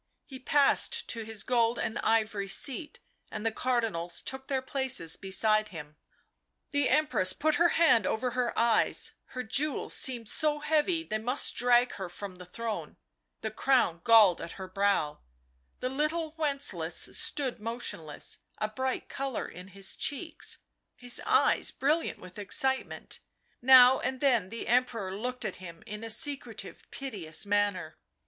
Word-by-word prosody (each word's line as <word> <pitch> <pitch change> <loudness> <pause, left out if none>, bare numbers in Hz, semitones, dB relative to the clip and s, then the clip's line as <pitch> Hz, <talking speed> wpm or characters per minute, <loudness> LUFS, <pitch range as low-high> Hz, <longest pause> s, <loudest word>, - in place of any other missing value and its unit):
He 265 -2 -10
passed 280 +1 +2
to 230 - -3
his 220 -2 -5
gold 235 -1 +2
and 225 - -2
ivory 215 -3 +1
seat, 275 - -2 0.3
and 215 0 -5
the 225 - +2
Cardinals 220 -9 -1
took 265 0 -6
their 270 -2 0
places 260 -12 +1
beside 215 +2 +2
him. 150 -4 -9 0.8
The 285 -2 +2
Empress 290 -11 +2
put 310 +6 +1
her 345 - +7
hand 280 - +5
over 245 +3 -1
her 250 -1 -1
eyes; 230 -1 +2 0.2
her 255 - -2
jewels 285 +6 -1
seemed 240 -4 0
so 300 +5 +1
heavy 315 +3 +1
they 215 -9 -3
must 250 +5 +1
drag 245 0 +4
her 190 -2 -5
from 185 +1 -8
the 180 -1 -11
throne, 225 +3 -5 0.4
the - - -3
crown 245 -11 +2
galled 220 -6 +6
her 190 -1 -8
brow; 195 -5 0 0.6
the 255 - -1
little 305 +4 -1
Wencelaus 275 - 0
stood 285 -5 -2
motionless, 210 -9 -5 0.2
a 215 - -2
bright 260 +4 -3
colour 270 -3 -4
in 180 +1 -11
his 195 0 -4
cheeks, 320 +3 -3 0.4
his 245 -1 0
eyes - - +3
brilliant 305 +5 0
with 185 +2 -12
excitement; 265 +6 -1 0.4
now 255 0 +8
and 260 - -3
then 240 -9 +2
the 230 +2 -6
Emperor 230 -6 +1
looked 250 +4 -4
at - - -4
him 170 -2 -11
in 210 +1 -7
a 225 - -5
secretive, 285 +4 -2
piteous 200 - -3
manner. 200 -5 0
235 Hz, 150 wpm, -29 LUFS, 200-265 Hz, 0.8 s, now